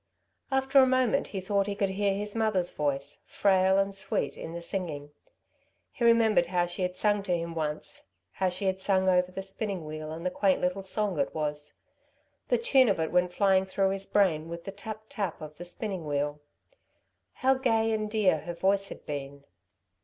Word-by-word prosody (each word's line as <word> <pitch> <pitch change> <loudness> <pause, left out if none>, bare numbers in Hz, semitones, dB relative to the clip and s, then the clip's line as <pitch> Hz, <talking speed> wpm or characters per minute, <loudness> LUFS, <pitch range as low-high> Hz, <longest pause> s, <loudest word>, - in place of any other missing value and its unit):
After 265 +1 +3
a 260 - +7
moment 255 -2 +2
he 195 - -4
thought 200 +1 0
he 200 - -2
could 200 -2 0
hear 200 0 +1
his 205 +1 -4
mother's 215 -6 0
voice, 140 -2 -3
frail 190 -1 +3
and 195 0 +1
sweet, 140 -7 -2
in 165 - -7
the 170 - -5
singing. 155 -7 -4 0.8
He - - -5
remembered 225 -6 +4
how 175 0 +1
she 175 +2 -5
had 180 0 -1
sung 205 0 +2
to 180 -3 0
him 170 0 -4
once, 155 -2 -4 0.3
how 190 -1 0
she 185 +2 -3
had 190 0 0
sung 190 -1 +2
over 180 0 +3
her 190 - -5
spinning 195 -3 -4
wheel 155 0 -6
and 165 +2 -7
the 180 - +1
quaint 190 0 +2
little 180 +2 -1
song 195 -3 -2
it 140 - -1
was. 150 -1 -4 0.7
The - - +3
tune 270 - +4
of 195 - +1
it 160 - -1
went 180 0 +2
flying 190 0 +3
through 190 0 +1
his 195 0 -4
brain 165 -6 +2
with 170 0 -6
the 195 - -6
tap 215 +2 -8
tap 200 -7 -3
of 150 -1 -9
the 175 - -8
spinning 185 -2 -5
wheel. 145 0 -1 0.9
How 265 0 +3
gay 225 -4 +1
and 215 -1 -1
dear 210 -7 +2
her 170 +3 -6
voice 195 +2 +1
had - - -10
been. 140 -1 -6
190 Hz, 200 wpm, -28 LUFS, 170-205 Hz, 0.9 s, a